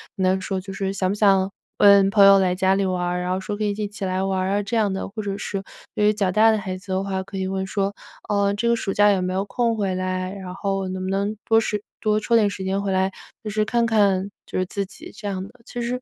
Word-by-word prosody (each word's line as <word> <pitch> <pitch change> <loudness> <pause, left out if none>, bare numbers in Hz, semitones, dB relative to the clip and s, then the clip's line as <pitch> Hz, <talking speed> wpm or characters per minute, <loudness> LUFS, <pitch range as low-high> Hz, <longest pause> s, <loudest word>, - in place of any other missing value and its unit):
能 190 -1 +1
说 190 0 -3
就 195 +1 -8
是： 195 0 -2
“想 185 - 0
不 - - 0
想 195 -2 +3 0.3
问 200 -1 +6
朋 200 0 +5
友 195 0 +8
来 185 -2 +2
家 190 +1 +2
里 195 0 +1
玩？ 180 -1 -1
“然 180 0 -2
后 185 - 0
说：” 205 +2 -4
可 215 - -2
以 205 - +1
一 210 +1 -3
起 205 0 -8
来 185 0 -1
玩 190 -1 0
啊。 205 +1 0
“这 205 +4 -3
样 210 -3 +2
的， 190 - -3
或 215 +2 -5
者 200 -1 -3
是 200 -1 -4 0.3
对 210 - +2
于 210 - +4
较 200 -3 0
大 215 +4 +5
的 220 - +2
孩 190 -2 -4
子 190 +1 -10
的 190 +1 0
话 190 -1 -2
可 195 0 -8
以 190 0 -1
问 190 0 -2
说：” 200 0 -1 0.4
呃， 200 -1 +2
这 215 +3 -1
个 235 - +4
暑 195 - -2
假 205 0 +5
有 195 -2 +1
没 185 0 -2
有 190 +1 0
空 230 +3 0
回 195 -3 0
来？ 185 0 -2
然 190 -2 -7
后 195 -1 -2
能 185 0 -4
不 185 - -3
能 200 +2 -1
多 225 0 +4
时 210 -2 -2 0.2
多 215 -1 +2
抽 235 - +1
点 210 -2 +3
时 195 -1 -6
间 195 +1 0
回 200 -1 -2
来。” 190 +1 +1 0.3
就 215 - -4
是 215 +1 +1
看 235 +2 +1
看 200 -3 +2
就 - - -5
是 185 - +1
自 200 +2 -3
己。 205 - -11
这 210 0 -7
样 190 -2 -3
的， 195 - -9 0.2
其 245 - -6
实 245 +1 -2
195 Hz, 305 characters per minute, -23 LUFS, 190-210 Hz, 0.4 s, 友